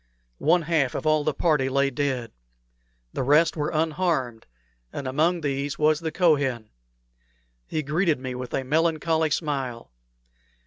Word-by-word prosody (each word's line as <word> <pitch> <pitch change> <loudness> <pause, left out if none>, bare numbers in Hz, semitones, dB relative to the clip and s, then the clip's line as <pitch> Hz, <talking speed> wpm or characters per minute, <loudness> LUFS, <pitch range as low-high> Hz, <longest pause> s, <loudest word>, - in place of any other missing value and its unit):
One 175 -1 +3
half 155 -5 +1
of - - -4
all 155 -1 +3
the 155 - +1
party 150 -3 +1
lay 140 +1 +1
dead. 130 -3 -2 0.8
The - - -2
rest 150 +5 +4
were 150 -2 -1
unharmed, 155 -7 -1 0.4
and 140 - -5
among 160 +6 +1
these 140 -1 -2
was 155 0 +3
the 160 -1 -3
Kohen. 140 - +1 1.0
He 155 - -2
greeted 155 +1 +1
me 130 -1 -5
with 125 0 -5
a 135 - -1
melancholy 160 +2 +1
smile. 135 - -3
150 Hz, 140 wpm, -25 LUFS, 135-160 Hz, 1.0 s, rest